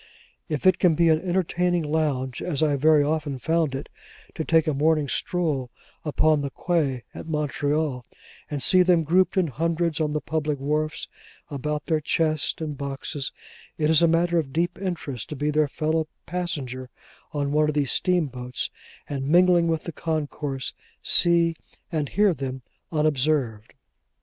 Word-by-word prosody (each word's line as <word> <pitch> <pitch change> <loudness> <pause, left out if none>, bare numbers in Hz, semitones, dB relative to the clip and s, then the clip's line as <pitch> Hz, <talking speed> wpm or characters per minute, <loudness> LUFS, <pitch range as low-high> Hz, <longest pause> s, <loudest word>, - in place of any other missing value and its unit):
If 150 +1 -3
it 185 -1 +5 0.2
be 170 +1 +4
an 160 0 +3
entertaining 180 -1 0
lounge 145 -5 -1
(as 160 -4 -1
I 150 -2 +3
very 150 +1 +4
often 145 -2 -1
found 160 0 0
it) 135 - -5 0.5
to 160 - -3
take 160 0 +3
a 155 - 0
morning 150 +1 +2
stroll 145 -3 -1 0.3
upon 155 0 +2
the 140 - -2
quay 140 -5 -1
at - - -8
Montreal, 150 -3 -1 0.5
and 145 -3 -2
see 185 -1 +6
them 175 -2 +4
grouped 180 +4 +2
in 185 - +4
hundreds 165 +3 -1
on 150 -1 0
the 150 - 0
public 150 -1 -2
wharfs 150 +3 -2 0.4
about 150 +1 -3
their 155 -2 +1
chests 155 0 0
and 155 -2 -4
boxes, 140 0 -4 0.5
it 155 0 +2
is 160 - +6
matter 170 +1 +2
of 140 -4 -3
deep 175 +5 -1
interest 155 - -4
to 150 - -5
be 150 +2 -1
their 150 0 +2
fellow 155 +2 -1 0.2
passenger 140 -8 -4 0.4
on 145 -1 -1
one 150 +1 +3
of 150 - -2
these 145 -3 +1
steamboats, 130 -9 -1 0.4
and 135 -1 -3
mingling 175 +1 +5
with 160 -1 0
the 170 - -5
concourse, 145 -4 -3 0.3
see 170 -1 +4 0.4
and 155 -4 -1
hear 205 -1 +3
them 130 -3 -5 0.3
unobserved. 145 -7 0
155 Hz, 155 wpm, -25 LUFS, 140-165 Hz, 0.5 s, see